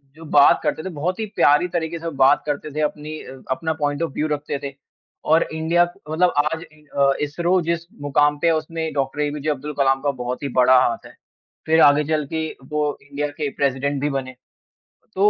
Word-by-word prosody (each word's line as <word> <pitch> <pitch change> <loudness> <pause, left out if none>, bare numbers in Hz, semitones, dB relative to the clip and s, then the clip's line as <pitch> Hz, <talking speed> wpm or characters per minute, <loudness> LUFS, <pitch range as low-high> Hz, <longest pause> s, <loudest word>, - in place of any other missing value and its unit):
जो 165 +1 -12
बात 140 - +7
करते 155 - -1
थे, 190 - -4
बहुत 175 +4 -3
ही 220 - -1
प्यारे 145 +5 +4
तरीके 165 0 -2
से 165 - -10
वो 165 - -2
बात 135 +1 +4
करते 150 0 -3
थे, 155 - -1
अपनी 150 +1 -3
अ, 130 0 -11
अपना 160 +4 -1
पॉइंट 145 +1 0
ऑफ 165 - -2
व्यू 155 - -1
रखते 145 -2 -3
थे। 140 -1 -5 0.5
और 160 +2 +5
इंडिया 160 +2 +2 0.3
मतलब 175 +3 +2
आज 160 +1 -1
नहीं 155 0 -22
अ, 140 0 +2
इसरो 170 +5 +1
जिस 170 0 -2 0.2
मुकाम 145 +1 +2
पे 170 - +1
है 165 - +4
उसमें 160 0 -3
डॉक्टर 140 +1 -1
एपीजे 150 +1 -2
अब्दुल 150 +1 -3
कलाम 135 0 +3
का 145 0 +1
बहुत 125 +3 -4
ही 140 - -2
बड़ा 125 0 +6
हाथ 115 -2 -1
है, - - -13 0.5
फिर 160 0 +4
आगे 145 +1 +6
चल 150 -1 0
के 160 0 -1 0.2
वो 150 -1 -1
इंडिया 145 +1 -2
के 150 -2 -1
प्रेसिडेंट 140 +1 0
भी 145 - 0
बने। 130 -2 -4 0.8
तो 200 +2 +5
150 Hz, 210 wpm, -22 LUFS, 140-160 Hz, 0.8 s, बात